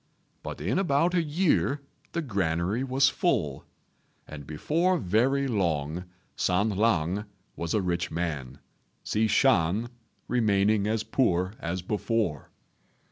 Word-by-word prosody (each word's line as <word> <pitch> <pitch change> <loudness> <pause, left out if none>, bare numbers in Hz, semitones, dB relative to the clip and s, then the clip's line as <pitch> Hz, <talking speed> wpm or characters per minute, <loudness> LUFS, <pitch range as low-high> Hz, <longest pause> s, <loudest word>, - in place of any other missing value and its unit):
But - - -6
in 95 - 0
about 170 -1 +2
a 175 - +3
year 155 -2 +1 0.3
the 170 - -1
granary 95 - 0
was 130 0 +3
full, 75 - 0 0.6
and 70 -2 -9
before 165 - +1
very 135 - +1
long 85 - -1 0.3
San 95 +4 +1
lang 100 -2 +1 0.3
was 85 +2 -2
a 105 - +1
rich 90 -1 -1
man, 75 -6 -3 0.5
Hsi 110 +1 +1
Shan 110 -1 +2 0.4
remaining 105 -3 +2
as 110 0 0
poor 95 -7 +1
as 85 +1 -3
before. 105 - -1
105 Hz, 120 wpm, -27 LUFS, 85-130 Hz, 0.6 s, a